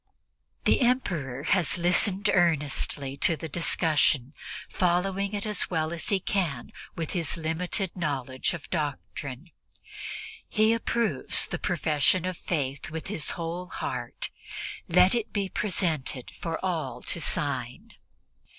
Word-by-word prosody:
." - - -46
The - - +4
Emperor 170 - +1
has 175 0 +3
listened 185 +4 +3
earnestly 150 -5 +1
to 160 +2 +4
the 160 - -5
discussion, 155 -4 +2 0.3
following 195 +3 +1
it 205 - -3
as 210 -3 +2
well 160 -2 0
as 170 - -4
he 200 - +3
can 175 - -1 0.2
with 165 -2 -3
his 170 -3 +1
limited 175 +4 -1
knowledge 140 -4 -1
of 160 - -9
doctrine. 150 -1 -4 1.0
He 220 +1 +4
approves 230 - +1
the - - -4
profession 155 +4 +2
of 185 0 -2
Faith 140 -6 -2
with 160 0 -5
his 155 - +1
whole 170 +2 -3
heart; - - -3 0.6
let 180 +1 +6
it 235 -2 -1
be 200 -2 0
presented 160 -11 -1
to 165 -1 -2
all 155 -10 -2
to - - -1
sign. - - -1
170 Hz, 130 wpm, -28 LUFS, 150-190 Hz, 1.0 s, let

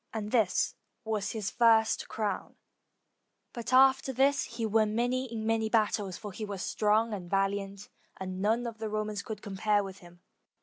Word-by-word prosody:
And 210 -1 -3
this 220 -7 +2 0.3
was 215 -3 -2
his 215 -3 -3
first 225 -2 +3
crown, 210 -3 -3 1.0
but 235 -1 -5
after 265 +1 +5
this 270 +2 +2
he 230 0 -4
won 215 0 +2
many 250 +1 0
in 220 -1 -4
many 225 0 +1
battles, 210 -4 +1
for 210 - -7
he 215 - -7
was 200 -3 -4
strong 215 +2 +1
and 180 -4 -6
val 195 +1 +2
iant, 200 0 -6 0.3
and 185 0 -5
none 225 +4 +1
of 230 -2 -6
the 220 -1 -3
Romans 215 -1 -2
could 215 -2 -7
compare 205 +1 +1
with 190 -1 -8
him. 175 0 -16
215 Hz, 175 wpm, -30 LUFS, 200-230 Hz, 1.0 s, after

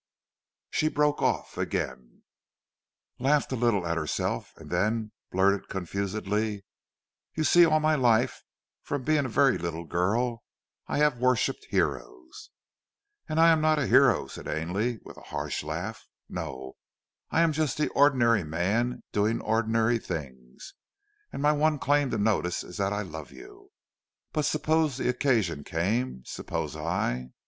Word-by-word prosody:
She 155 - +1
broke 150 -1 +1
off - - -1
again, 65 -2 -4 1.0
laughed 140 +3 +2
a - - 0
little 115 -6 +1
at 85 0 -1
herself 75 -5 -2
and - - -12
then 110 0 0 0.2
blurted 95 +1 +1
confusedly: 100 +2 -2 0.7
"You 155 - 0
see 175 +2 +6
all 155 -1 +3
my 155 0 +2
life, 120 -6 +2 0.4
from 145 -2 -4
being 150 0 +2
a - - -3
very 135 +3 +3
little 85 -1 -4
girl, 115 +8 0 0.5
I - - -2
have 150 -4 +2
worshipped 130 - +1
heroes." 360 -5 -3 0.8
"And 155 +1 0
I 165 0 +7
am 160 -1 +3
not 155 0 +3
a 145 - +1
hero," - - +5
said - - -9
Ainley 95 +10 -1
with - - -12
a - - -12
harsh - - -3
laugh. - - -5 0.2
"No! 65 0 -6 0.5
I 165 - +2
am 165 -1 +4
just 155 -2 -1
the 150 - +1
ordinary 120 -7 +4
man 100 +10 -1
doing 105 +3 +1
the - - -8
ordinary 115 +1 +1
things, 65 - -8 0.6
and 140 - -5
my 150 - +5
one 150 +1 +2
claim 145 0 +2
to 115 - -1
notice 100 -4 0
is 90 - -10
that 100 0 0
I 105 0 -1
love 80 -4 -8
you! 395 +1 -14 0.6
But 150 -2 0
suppose 155 -1 +1
the 130 - 0
occasion 110 - +1
came? 95 - -1
Suppose 75 -1 -4
I 65 -5 -2
115 Hz, 150 wpm, -27 LUFS, 90-145 Hz, 1.0 s, I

